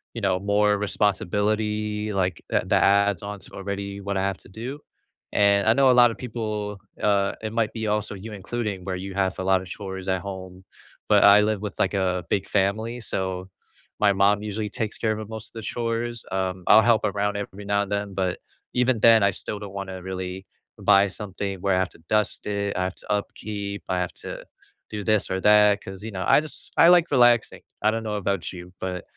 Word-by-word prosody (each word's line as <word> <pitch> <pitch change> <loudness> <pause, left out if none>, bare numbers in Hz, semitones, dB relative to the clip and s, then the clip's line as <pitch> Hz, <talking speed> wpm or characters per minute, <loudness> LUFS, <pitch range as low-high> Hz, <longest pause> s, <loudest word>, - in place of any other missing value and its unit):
you 115 - -4
know, 95 -2 +1
more 105 +1 +2
responsibility, 105 +1 0
like, 95 -4 -1
a - - +1
that - - +3
adds 100 -1 +3
on 105 0 -6
to - - -10
already 100 0 -5
what 100 0 -2
I - - +1
have 95 -1 -1
to - - -15
do. 120 +8 -6 0.5
And 100 0 +3
I 110 - +6
know 135 +1 +5
a - - +5
lot 120 -1 +7
of - - -8
people, 105 -4 -4 0.2
uh, 100 -1 +2
it 110 0 -4
might 115 -2 +1
be 110 -1 -4
also 105 0 -1
you 105 +3 -8
including, 105 -1 -4
where 95 0 -3
you 95 +1 -6
have 95 -1 0
a - - -2
lot 95 0 +3
of 95 - -10
chores 95 0 -7
at 95 -1 0
home, 95 -1 -8 0.5
but - - +5
I 100 +1 +8
live 105 -1 0
with, 105 -1 -5
like, - - +1
a 90 -2 0
big 100 - 0
family, 110 +5 0
so, 95 -3 -3 0.5
my 100 -1 +4
mom 100 +1 +3
usually 105 0 -3
takes 110 +1 -4
care 110 - 0
of 110 - -5
of 110 -1 -7
most 110 0 -7
of - - -27
the 115 - -7
chores. 115 +1 -3
Um, 95 -1 -2
I'll 110 - +8
help 115 -1 +3
around 105 0 -1
every 100 0 -7
now 100 0 +1
and 100 - -9
then, 100 -1 -2
but, 95 -1 -1 0.3
even 125 -1 +2
then, 115 -1 +7
I 100 - +4
still 100 +2 -6
don't 100 -2 -8
wanna 95 -2 -6
really 95 0 -5 0.3
buy 100 +1 +5
something 100 0 -5
where 95 -1 +2
I - - +2
have 95 -1 0
to - - -17
dust 105 -1 0
it, 100 -1 -2
I 90 - +1
have 95 - -4
to - - -8
upkeep, 100 -1 -4
I 90 - 0
have 90 -1 -2
to - - -7 0.4
do 105 -1 -5
this 110 0 +1
or 95 0 -1
that, 105 0 +5
'cause, 95 0 -9
you 110 - -5
know, 95 -2 -4
I - - +6
just 155 - -9
I 165 - +7
like 175 -2 +5
relaxing. 120 -3 +4 0.2
I 110 - +4
don't 115 0 -3
know 105 -1 -3
about 100 -3 -2
you, 90 0 -10
but 90 -1 -4
100 Hz, 220 wpm, -24 LUFS, 95-110 Hz, 0.5 s, I